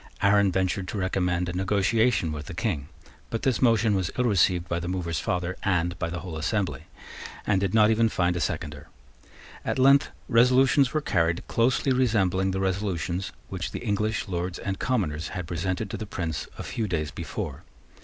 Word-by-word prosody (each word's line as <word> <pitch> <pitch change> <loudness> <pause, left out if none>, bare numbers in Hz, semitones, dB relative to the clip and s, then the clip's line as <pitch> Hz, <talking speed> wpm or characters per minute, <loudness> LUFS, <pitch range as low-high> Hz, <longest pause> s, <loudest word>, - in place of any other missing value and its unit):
Arran 100 -1 +5
ventured 95 +1 0
to 105 - -4
recommend 90 -2 0
a 85 - -3
negotiation 100 +1 +2
with 75 -1 -6
the 90 - -7
King. 85 -7 -2 0.4
But 115 - -3
this 130 -3 +1
motion 115 -3 +4
was 95 -3 0
ill 125 - +2
received 90 -5 +3
by 85 - -1
the 85 - -5
mover's 85 -3 -2
father 90 0 -2
and 90 -2 +1
by 85 - -1
the 85 -1 -5
whole 85 -3 -6
assembly, 95 +4 -1 0.6
and 95 -2 +2
did 100 +1 0
not 110 0 +6
even 115 +1 +3
find 90 -3 +1
a - - -1
seconder. 75 -3 -3 0.8
At - - -1
length 135 +2 +5 0.2
resolutions 130 +2 +4
were 155 - 0
carried 85 - 0
closely 125 +3 +2
resembling 100 -7 +2
the 95 0 -1
resolutions 95 -1 -1 0.2
which 90 -2 -4
the - - -5
English 105 0 0
Lords 90 0 -3
and 95 -1 -4
Commoners 80 - -1
had 90 - -3
presented 90 +5 -2
to - - -3
the 110 - -6
Prince 85 -6 -3
a - - -5
few 110 -2 -3
days 80 -5 -2
before. - - -5
95 Hz, 185 wpm, -26 LUFS, 85-110 Hz, 0.8 s, not